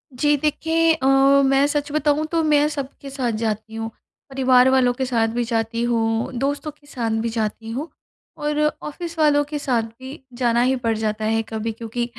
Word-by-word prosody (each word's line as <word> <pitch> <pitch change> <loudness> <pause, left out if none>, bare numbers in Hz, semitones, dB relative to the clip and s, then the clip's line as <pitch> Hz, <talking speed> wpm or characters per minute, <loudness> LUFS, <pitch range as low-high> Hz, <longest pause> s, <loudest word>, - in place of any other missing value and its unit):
जी 295 +4 +3
देखिए, 325 +3 +2
अ, 305 -5 -3 0.4
मैं 270 +1 +4
सच 290 0 -2
बताऊँ 300 0 +1
तो 335 -1 +2
मैं 300 -1 +3
सबके 280 -1 -6
साथ 265 -3 -2
जाती 220 0 -3
हूँ। 225 0 -4 0.4
परिवार 260 -1 +4
वालों 260 -2 +3
के 260 +1 -2
साथ 230 -3 +1
भी 240 - +1
जाती 230 0 -1
हूँ, 225 -1 0
दोस्तों 285 +3 -2
के 295 0 -26
साथ 240 -5 -3
भी 230 - -1
जाती 225 0 -3
हूँ 285 +8 -4 0.5
और 300 0 -1 0.2
ऑफ़िस 335 +2 -7
वालों 295 -2 +4
के 295 -1 -3
साथ 250 -5 0 0.2
भी 260 +3 -9 0.2
जाना 240 -1 +2
ही 255 +2 +2
पड़ 225 -1 +2
जाता 215 0 -2
है 225 +1 +1
कभी 225 0 -3
क्योंकि 230 +2 -4
260 Hz, 185 wpm, -22 LUFS, 230-295 Hz, 0.5 s, मैं